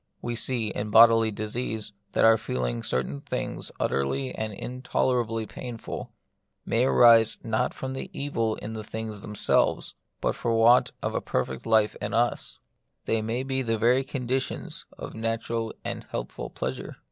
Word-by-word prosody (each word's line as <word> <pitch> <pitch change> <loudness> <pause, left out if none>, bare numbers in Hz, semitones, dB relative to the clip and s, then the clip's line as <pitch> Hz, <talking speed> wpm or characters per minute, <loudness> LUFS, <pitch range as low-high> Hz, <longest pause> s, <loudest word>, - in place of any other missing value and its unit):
We 120 - -3
see, 120 -2 0
in 105 +1 -3
bodily 115 0 +7
disease, 110 0 -3 0.2
that - - +4
our 115 0 +8
feeling 65 - -2
certain 70 +2 -2
things - - -4
utterly 125 - 0
and 110 0 -3
intole 125 +4 -1
rably 115 -1 -4
painful, 120 -3 -7 0.5
may 120 +2 +2
arise 115 -4 +6
not 115 +3 0
from 130 0 -4 0.2
evil 115 -6 -1
in 110 +2 -7
the 110 -1 -5
things 110 -1 -6
themselves, 105 0 +1 0.3
but - - 0
from 115 - -1
want 115 +2 +5
of - - -1
a - - -1
perfect 65 - -2
life 110 -1 +3
in - - -2
us; 120 +1 0 0.5
they 115 - +1
may 115 +4 -2
be 135 0 -1
the 115 -3 0
very 120 +4 +3
conditions 130 -1 -3
of - - -7
natural 115 0 -2
and - - -5
healthful - - -5
pleasure. 65 0 -5
115 Hz, 155 wpm, -27 LUFS, 110-120 Hz, 0.5 s, our